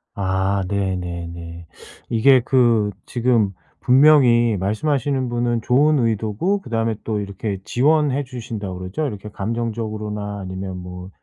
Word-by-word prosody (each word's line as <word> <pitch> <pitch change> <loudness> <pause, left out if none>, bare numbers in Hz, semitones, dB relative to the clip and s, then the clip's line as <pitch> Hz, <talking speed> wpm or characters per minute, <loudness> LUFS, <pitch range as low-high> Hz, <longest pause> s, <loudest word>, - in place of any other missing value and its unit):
아. 95 0 0
네, 100 -1 -1
네, 85 -1 -5
네. 85 0 -9 0.4
이게 130 +3 +5
그 120 -6 +3 0.2
지금 120 -4 +1 0.3
분명히 125 -5 +5
말씀하시는 130 - 0
분은 120 -1 0
좋은 145 +4 +3
의도고 115 - 0
그다음에 115 -4 -1
또 110 -2 -2
이렇게 100 0 -4
지원해 145 +2 +2
주신다고 110 -7 -6
그러죠? 95 +12 -3
이렇게 105 -4 -7
감정적으로나 105 -1 -4
아니면 95 0 -5
뭐 90 0 -8
110 Hz, 295 characters per minute, -21 LUFS, 95-125 Hz, 0.4 s, 이게